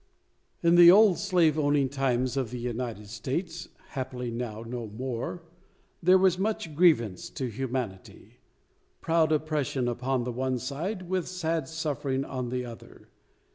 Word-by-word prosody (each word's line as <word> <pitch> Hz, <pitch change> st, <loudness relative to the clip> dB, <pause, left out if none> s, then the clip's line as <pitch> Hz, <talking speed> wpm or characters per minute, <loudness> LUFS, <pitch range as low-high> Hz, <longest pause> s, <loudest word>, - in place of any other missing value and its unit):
In 170 Hz, 0 st, +5 dB
the 175 Hz, 0 st, +10 dB
old 195 Hz, -2 st, +6 dB
slave 170 Hz, -5 st, +2 dB
owning 145 Hz, -2 st, +2 dB
times 130 Hz, -2 st, 0 dB
of 130 Hz, -4 st, -1 dB
the 125 Hz, -, -6 dB
United 120 Hz, -3 st, -4 dB
States 160 Hz, -, -4 dB, 0.2 s
happily 125 Hz, -2 st, -4 dB
now 115 Hz, -2 st, -5 dB
no 115 Hz, 0 st, -5 dB
more 125 Hz, +9 st, -5 dB, 0.6 s
there 185 Hz, +2 st, +6 dB
was 185 Hz, -1 st, +3 dB
much 195 Hz, -7 st, -2 dB
grievance 120 Hz, -, +3 dB
to 130 Hz, -, -4 dB
humanity; 125 Hz, -5 st, -5 dB, 0.6 s
proud 165 Hz, -1 st, +2 dB
oppression 150 Hz, -4 st, 0 dB
upon 125 Hz, +1 st, -1 dB
the 125 Hz, -, -3 dB
one 130 Hz, +1 st, -1 dB
side, 170 Hz, -, -4 dB
with 185 Hz, -1 st, -1 dB
sad 165 Hz, -5 st, -2 dB
suffering 140 Hz, -4 st, -2 dB
on 130 Hz, -2 st, -4 dB
the 125 Hz, 0 st, -2 dB
other. 115 Hz, -1 st, -12 dB
135 Hz, 140 wpm, -28 LUFS, 125-165 Hz, 0.6 s, the